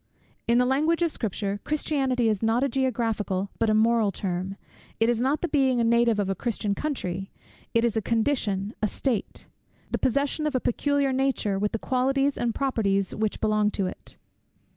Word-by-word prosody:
In 235 +1 +4
the 250 - +4
language 310 +6 +2
of 335 - +1
Scripture, 205 -4 -3
Christianity 270 -5 0
is 215 -3 0
not 225 +3 +2
a - - +3
geographical, 225 -7 -1
but 225 - +2
a 215 - +3
moral 220 -1 +3
term. 185 0 -3 0.4
It 225 +1 +3
is 240 -1 +1
not 275 +4 +1
the 350 - 0
being 265 -5 +2
a - - +3
native 235 -1 +3
of 205 -2 0
a 195 - 0
Christian 210 0 -2
country: 195 -9 -3 0.5
it 230 +1 +4
is 235 - 0
a 220 - +1
condition, 220 -3 0
a 215 - +2
state; 235 0 -2 0.5
the - - -1
possession 280 +4 0
of 295 - -2
a - - +3
peculiar 280 +2 +1
nature, 255 -7 0
with 210 +1 0
the - - -1
qualities 270 +4 +1
and 235 -1 -1
properties 200 -8 0
which 215 -1 -2
belong 215 -1 +2
to 200 -2 -2
it. 185 - -8
230 Hz, 185 wpm, -26 LUFS, 210-265 Hz, 0.5 s, In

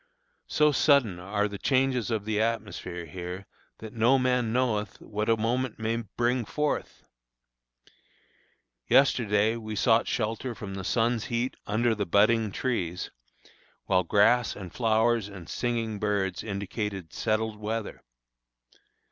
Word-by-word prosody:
So 150 0 +3
sudden 140 - +3
are 100 +3 -1
the 100 -1 -7
changes 130 -4 +1
of 110 -3 -2
the 110 -1 0
atmosphere 105 -6 -3
here 90 +4 -7 0.3
that 110 +1 -9
"no 120 +4 +4
man 125 -3 +1
knoweth 115 -4 0
what 105 +1 -3
a 115 - +4
moment 120 +2 -1
may 115 +1 -1
bring 120 +2 -1
forth." 150 +7 -2 1.8
Yesterday 110 -5 +3
we 110 -1 -6
sought 115 +2 +3
shelter 115 +2 -2
from 100 -3 -7
the 95 0 -5
sun's 115 +2 +1
heat 120 +2 -2
under 115 +3 +2
the 105 -2 -2
budding 110 +3 +3
trees, 90 -8 -2 0.7
while 95 -1 +3
grass 110 +7 +3
and 95 -4 -9
flowers 115 -2 +2
and 95 -4 -10
singing 115 -3 -2
birds 100 -3 -1
indicated 100 -3 -4
settled 110 -1 -1
weather. 110 0 -4
110 Hz, 130 wpm, -27 LUFS, 100-120 Hz, 1.8 s, no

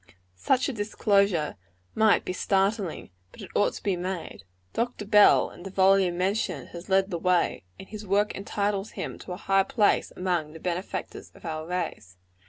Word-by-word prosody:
Such 255 - +2
a 275 - -2
disclosure 200 - +1 0.4
might 220 -1 +3
be 185 - -2
startling; 195 - 0 0.2
but - - -16
it - - -10
ought 205 - +2
to - - -9
be 195 -2 +1
made. 180 - -5 0.3
Dr. 235 -2 -2
Bell, 210 0 +5
in - - -13
the 195 - -7
volume 190 -2 +3
mentioned, 195 +5 -1
has 170 +3 -10
led 195 +1 +2
the 170 - -2
way; 180 - +1
and 190 - -11
his 215 -1 -8
work 205 +2 +2
entitles 200 0 -2
him - - -5
to 180 - -7
a - - -6
high 195 0 +2
place 205 +2 +2
among 175 -4 -1
the 160 - -10
benefactors 180 +2 -4
of - - -15
our 155 0 -4
race. 165 - -4
190 Hz, 180 wpm, -27 LUFS, 175-205 Hz, 0.4 s, Bell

